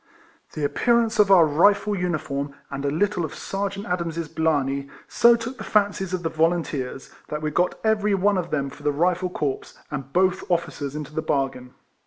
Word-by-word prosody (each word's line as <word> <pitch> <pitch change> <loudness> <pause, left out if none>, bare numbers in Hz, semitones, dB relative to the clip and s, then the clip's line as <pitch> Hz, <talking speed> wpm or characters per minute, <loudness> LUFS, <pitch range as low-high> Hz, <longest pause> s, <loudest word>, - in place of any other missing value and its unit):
The 155 - -4
appearance 235 +8 +2
of 205 -1 +5
our 180 -4 +7
Rifle 200 +7 +3
uniform, 150 -6 -2 0.2
and 140 0 -4
a 140 - +1
little 185 +4 0
of 155 - -5
Sergeant 200 +1 -4
Adams's* 170 -2 -2
blarney, 140 -4 0 0.2
so 235 0 +5
took 235 +3 -6
the - - -5
fancies 200 -3 +1
of 185 -1 -2
the 165 - 0
volunteers, 160 -5 -1 0.2
that 150 0 -4
we 150 - -1
got 175 +4 0
every 210 -2 +2
one 195 0 +2
of 175 -1 -4
them 140 -2 -1
for 145 - -14
the 145 0 +1
Rifle 180 +4 +1
corps, 145 -6 -3 0.2
and 135 -2 -5
both 185 +2 +2
officers 155 -5 -2
f - - -3
into 150 -1 -7
the 160 - -1
bargain. 135 -4 -2
170 Hz, 190 wpm, -24 LUFS, 145-195 Hz, 0.2 s, our